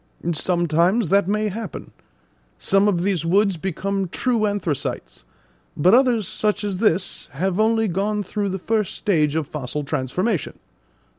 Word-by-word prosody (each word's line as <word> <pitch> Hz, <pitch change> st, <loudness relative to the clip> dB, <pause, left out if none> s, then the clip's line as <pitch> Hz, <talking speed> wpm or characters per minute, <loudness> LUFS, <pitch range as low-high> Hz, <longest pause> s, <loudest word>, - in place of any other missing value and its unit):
"Sometimes 175 Hz, +4 st, +1 dB
that 200 Hz, 0 st, +3 dB
may 210 Hz, +1 st, 0 dB
happen; 220 Hz, +3 st, -7 dB, 0.7 s
some 195 Hz, +1 st, +2 dB
of 175 Hz, -4 st, +1 dB
these 190 Hz, -5 st, 0 dB
woods 195 Hz, +3 st, +2 dB
become 195 Hz, +3 st, -2 dB
true 225 Hz, +4 st, 0 dB
anthracites; 195 Hz, -9 st, -3 dB, 0.5 s
but 180 Hz, +7 st, +4 dB
others, 240 Hz, -5 st, +4 dB
such 210 Hz, +1 st, -1 dB
as 200 Hz, -3 st, -2 dB
this, 195 Hz, -4 st, 0 dB
have 185 Hz, +6 st, -1 dB
only 225 Hz, 0 st, +3 dB
gone 205 Hz, +3 st, -1 dB
through 205 Hz, +1 st, -2 dB
the 190 Hz, -, -2 dB
first 215 Hz, +1 st, -1 dB
stage 155 Hz, -8 st, +1 dB
of 160 Hz, -3 st, -1 dB
fossil 145 Hz, 0 st, -4 dB
transformation. 150 Hz, -, -2 dB
195 Hz, 140 wpm, -22 LUFS, 170-210 Hz, 0.7 s, but